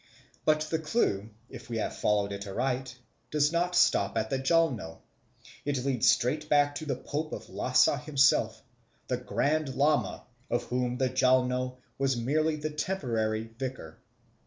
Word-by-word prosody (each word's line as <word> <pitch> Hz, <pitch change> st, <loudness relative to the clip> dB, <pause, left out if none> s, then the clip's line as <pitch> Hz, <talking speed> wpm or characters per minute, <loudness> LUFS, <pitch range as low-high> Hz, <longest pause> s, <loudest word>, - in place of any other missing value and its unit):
But 155 Hz, 0 st, +3 dB
the 155 Hz, +1 st, -1 dB
clue, 150 Hz, -, 0 dB, 0.2 s
if 120 Hz, -1 st, -11 dB
we 115 Hz, -, -2 dB
have 110 Hz, -, -2 dB
followed 105 Hz, -1 st, +1 dB
it 100 Hz, +1 st, -6 dB
aright, 130 Hz, +5 st, -2 dB, 0.3 s
does 150 Hz, +1 st, +2 dB
not 175 Hz, +1 st, 0 dB
stop 100 Hz, -, +3 dB
at 110 Hz, 0 st, -1 dB
the 135 Hz, -, 0 dB
Jalno; 135 Hz, -, +1 dB, 0.7 s
it 145 Hz, -1 st, -1 dB
leads 130 Hz, -4 st, +3 dB
straight 150 Hz, +5 st, +1 dB
back 145 Hz, -1 st, +4 dB
to 155 Hz, +1 st, -5 dB
the 140 Hz, -, 0 dB
pope 155 Hz, +2 st, -4 dB
of -, -, -7 dB
Lhasa 130 Hz, +2 st, +3 dB
himself, 140 Hz, -7 st, +2 dB, 0.5 s
the 125 Hz, -, +1 dB
Grand 140 Hz, +3 st, -1 dB
Lama, 145 Hz, +2 st, +1 dB, 0.3 s
of 120 Hz, -, 0 dB
whom 125 Hz, 0 st, -2 dB
the 130 Hz, -, +2 dB
Jalno 125 Hz, 0 st, +2 dB, 0.2 s
is 135 Hz, -2 st, +1 dB
merely 155 Hz, +6 st, +1 dB
the 155 Hz, 0 st, -4 dB
temporary 115 Hz, -10 st, -2 dB
vicar. 130 Hz, -12 st, -6 dB
130 Hz, 155 wpm, -29 LUFS, 120-150 Hz, 0.7 s, back